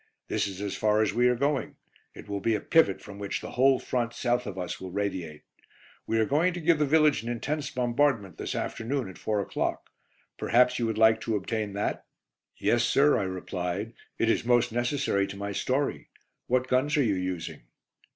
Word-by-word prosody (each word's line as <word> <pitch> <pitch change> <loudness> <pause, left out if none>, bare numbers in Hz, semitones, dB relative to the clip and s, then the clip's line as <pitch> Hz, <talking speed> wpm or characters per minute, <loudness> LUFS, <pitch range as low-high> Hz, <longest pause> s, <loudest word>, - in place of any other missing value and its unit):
This - - 0
is 95 0 -6
as 100 - -3
far 105 0 +2
as 105 - 0
we 120 +1 +3
are 125 - +3
going; 140 +3 -1 0.4
it - - -11
will 100 -1 -3
be 110 +3 +1
a - - -1
pivot 160 - +3
from 100 -1 -10
which 100 -1 -3
the - - -8
whole 135 +1 +4
front 120 -2 -2
south 125 -1 0
of 100 -2 -6
us 90 -2 -4
will 95 - -6
radiate. 90 -5 -4 0.6
We 115 - +1
are 110 - +3
going 160 +9 +2
to 175 - -5
give 165 -1 +3
the 150 - +2
village 155 -1 +4
an 115 - -6
intense 145 +5 -2
bombardment 120 - 0
this - - -3
afternoon, 125 +2 -2
at 90 - -12
4 105 -2 0
o'clock; - - -3 0.5
perhaps 125 +1 +3
you 115 - 0
would 110 -1 -2
like 110 0 +5
to 115 - -1
obtain 105 +1 -2
that?" 100 +1 -3 0.5
"Yes, 120 0 +2
sir," 145 +1 +4
I - - 0
replied, 95 +3 -4 0.2
"it 115 - +1
is 115 - +2
most 120 0 +3
necessary 120 -4 0
to 100 - -8
my 100 0 -4
story. 130 +7 -1 0.4
What 130 +1 +1
guns 140 +5 +2
are 145 - +4
you 110 -5 +2
using?" 90 -3 -4
115 Hz, 200 wpm, -28 LUFS, 100-130 Hz, 0.6 s, like